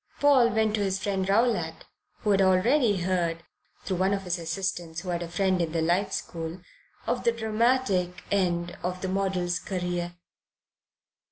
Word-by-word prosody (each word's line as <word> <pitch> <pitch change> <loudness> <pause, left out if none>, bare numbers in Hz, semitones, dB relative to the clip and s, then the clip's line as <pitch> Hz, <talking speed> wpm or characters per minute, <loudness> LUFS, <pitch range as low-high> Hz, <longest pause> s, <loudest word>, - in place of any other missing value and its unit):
Paul 275 -5 +5
went 220 -1 +1
to 215 - 0
his 195 -1 0
friend 195 -1 -1
Rowlatt, 195 -7 +1 0.4
who 210 - +1
had 195 -1 +4
already 200 +3 +3
heard, 170 -2 0 0.4
through 185 - -2
one 190 +2 +2
of 195 - -5
his 180 -1 -2
assistants 170 -1 -3
who 185 - -7
had 175 -1 -1
a 170 - -4
friend 185 +1 +1
in 165 -1 -2
the 165 - +1
Life 175 +4 +1
School, 165 +1 -5 0.4
of 245 0 -1
the 235 - +4
dramatic 220 -5 0
end 175 -3 0
of 180 +1 -3
the - - 0
model's 185 -2 0
career. 175 -2 -3
185 Hz, 165 wpm, -27 LUFS, 175-205 Hz, 0.4 s, Paul